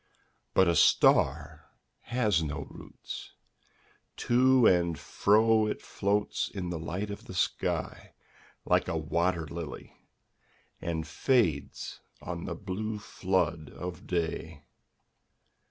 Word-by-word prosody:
'But 95 - +5
a 85 - +3
star 75 +1 +3 0.4
has 105 -8 +1
no 75 -2 -4
roots: - - -9 0.8
to 130 0 +4
and 85 -4 +3
fro 110 +1 +3
It - - -2
floats 100 +1 -1
in 90 -3 -5
the 85 - -3
light 90 +6 -4
of 100 - -8
the 95 - -9
sky, 85 - -2 0.5
like - - +2
a 80 - -1
wat«r 85 +2 0
]ily. 85 0 -7 0.9
And 80 -2 -2
fades 85 - 0 0.2
on 85 -1 -6
the 85 - -4
blue 105 +4 -4
flood 90 -6 -1
of 90 0 -7
day. 85 -3 -3
90 Hz, 110 wpm, -29 LUFS, 80-105 Hz, 0.9 s, But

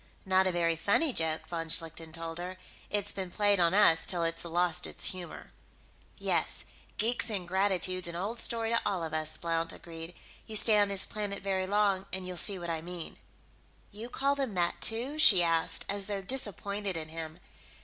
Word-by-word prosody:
"Not 190 0 +3
a - - +1
very 170 -1 +1
funny 205 - +1
joke," 160 -3 -1
von 165 -1 -4
Schlichten 165 0 -1
told 165 0 -4
her. 180 +1 -6 0.3
"It's 205 -1 +1
been 190 -2 -5
played 205 +1 +2
on 170 +1 +3
us 165 -6 +5
till 175 -2 +1
it's 165 0 -1
lost 175 0 0
its - - 0
humor." 180 -2 -9 0.7
"Yes, - - -1 0.3
geek 235 +2 +1
ingratitude's 185 -2 0
an 170 - -6
old 205 +7 -3
story 230 -1 +1
to 230 - +2
all 185 -4 -1
of 160 -1 -5
us," 155 0 +1
Blount 165 -1 -1
agreed. 165 0 -9 0.3
"You 220 - -6
stay 215 0 +4
on 205 - +4
this 200 -1 +3
planet 205 -2 -4
very 190 -1 -1
long 200 -1 +1
and 185 -1 -2
you'll 180 - -5
see 200 +2 +2
what 170 -1 -4
I 160 -1 -3
mean." 175 0 -8 0.7
"You 220 +4 -8
call 275 +2 +1
them 270 -7 -3
that, 175 -1 0
too?" 250 +7 +2
she 190 - +8
asked, 165 -1 +3
as 200 -1 -2
though 200 -2 -3
disappointed 200 -4 -1
in 155 -1 -6
him. 160 0 -7
185 Hz, 190 wpm, -30 LUFS, 165-205 Hz, 0.7 s, she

